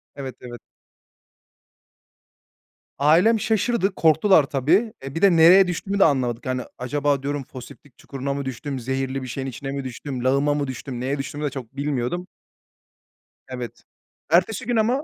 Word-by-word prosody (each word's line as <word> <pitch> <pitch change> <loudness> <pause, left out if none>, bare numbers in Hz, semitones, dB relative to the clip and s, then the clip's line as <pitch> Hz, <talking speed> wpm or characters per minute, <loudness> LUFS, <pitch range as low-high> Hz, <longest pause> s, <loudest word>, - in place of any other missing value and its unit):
Evet, 135 -3 -6
evet. 120 -2 -9 2.4
Ailem 175 +11 +4
şaşırdı, 215 -2 0
korktular 160 +1 +4
tabii. 160 - +1
Eee, 135 +2 -7
bir 165 - -3
de 200 -2 +6
nereye 180 +4 +7
düştüğümü 195 +3 -3
de - - +7
anlamadık. 125 -6 0
Yani, 130 0 -1 0.2
acaba 140 +2 -1
diyorum, 145 -1 -2
"Foseptik 130 +1 -13
çukuruna 140 0 -5
mı 140 -1 -4
düştüm? 130 +1 -5
Zehirli 135 +2 -3
bir - - -6
şeyin 135 +2 -4
içine 135 +2 -6
mi 140 -1 -4
düştüm? 130 0 -6
Lağıma 140 +3 +2
mı 145 -2 -2
düştüm?" 130 -1 -6
Neye 135 +3 -2
düştüğümü 140 +2 -5
de - - 0
çok 135 -2 -9
bilmiyordum. 145 +5 -2 1.2
Evet, 125 -2 -7 0.5
ertesi 185 +8 +2
gün 245 0 -1
ama 240 +6 +1
140 Hz, 150 wpm, -23 LUFS, 130-175 Hz, 2.4 s, nereye